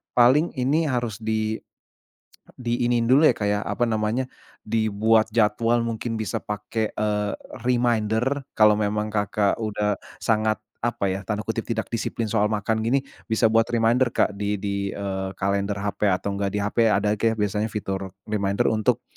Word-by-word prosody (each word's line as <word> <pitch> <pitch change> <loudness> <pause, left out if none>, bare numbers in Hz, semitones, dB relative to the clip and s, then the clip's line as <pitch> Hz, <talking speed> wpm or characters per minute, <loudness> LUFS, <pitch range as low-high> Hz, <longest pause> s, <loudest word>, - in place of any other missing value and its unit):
paling 130 +7 +5
ini 150 +6 +2
harus 120 -3 -2
di 110 0 0 1.1
diiniin 120 -1 +1
dulu 135 +5 +6
ya, 155 - +7
Kak, 105 - -1
ya, 105 0 +1
apa 120 -1 0
namanya, 110 +4 0 0.4
dibuat 110 0 +2
jadwal 115 +2 +2
mungkin 115 0 -3
bisa 110 - -3
pake, 105 +1 -3
eee, 105 -1 -1 0.3
reminder. 120 +2 +1
Kalau 105 -1 +5
memang, 105 0 -1
Kakak, 105 -1 +1
udah 105 -1 -1 0.2
sangat 110 -1 +1 0.2
apa 105 -5 0
ya, 95 +1 -4
tanda 105 0 -2
kutip 110 +1 -3
"tidak 110 -2 -3
disiplin 115 -1 -2
soal 105 -1 +2
makan" 110 +1 0
gini, 130 +4 +2 0.2
bisa 110 0 +2
buat 115 0 +4
reminder, 120 +2 +2
Kak - - +2
di 105 0 -1
di, 100 -1 -2
eee, 95 -1 -3
kalender 100 +1 0
HP 100 +1 -2
atau 95 +2 -1
enggak 100 0 -1
di - - +1
HP 115 +3 +2
ada 105 -1 +2
kayak 115 +1 +2
biasanya 105 +1 0
fitur 95 -3 -4
reminder 100 -2 +1
untuk, 115 +2 +1
110 Hz, 160 wpm, -24 LUFS, 105-115 Hz, 1.1 s, ya